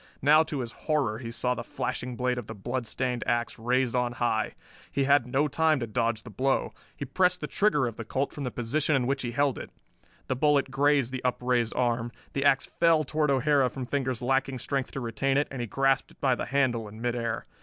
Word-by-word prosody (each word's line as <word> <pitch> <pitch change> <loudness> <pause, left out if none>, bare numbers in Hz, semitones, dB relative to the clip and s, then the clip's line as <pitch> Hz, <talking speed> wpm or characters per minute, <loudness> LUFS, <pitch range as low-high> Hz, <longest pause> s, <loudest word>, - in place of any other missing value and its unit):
Now 150 +3 +7
to 150 -4 -2
his 120 -2 -5
horror 135 -9 -1
he 120 -2 -6
saw 125 +2 0
the - - -5
flashing 125 -1 -4
blade 125 +1 0
of 120 - -8
the - - -7
bloodstained 125 +2 -2
ax 120 -1 0
raised 125 +1 +1
on 125 -1 +1
high. 115 -2 0 0.4
He 140 - +1
had 140 -2 +4
no 135 +4 +1
time 155 +1 +2
to 120 - -2
dodge 115 0 -1
the 115 - -10
blow. 135 +6 0 0.2
He 140 - -4
pressed 180 +5 +2
the - - -3
trigger 195 -11 +2
of 115 -2 -4
the 115 - -4
Colt 130 +5 -2
from 145 - -5
the 125 - -1
position 140 +6 0
in 130 -2 +1
which 135 +2 0
he 120 - -2
held 140 +2 +1
it. - - -8 0.6
The 130 - -1
bullet 145 0 +2
grazed 140 -1 +2
the 130 -1 -5
upraised 125 -2 0
arm. 120 -1 0 0.2
The 135 - -1
ax 140 -2 +4
fell 165 -2 +3
toward 150 +1 0
O'Hara 140 0 +3
from 130 +1 -6
fingers 130 -2 -2
lacking 135 +1 +1
strength 135 +1 -2
to - - -3
retain 135 +3 0
it, 145 - +2
and 135 -2 -4
he 120 - -3
grasped 135 +5 +1
it - - -28
by 135 -2 +3
the - - -2
handle 120 -4 +1
in 105 +1 -11
midair. 115 -1 -2
130 Hz, 225 wpm, -28 LUFS, 120-140 Hz, 0.6 s, Now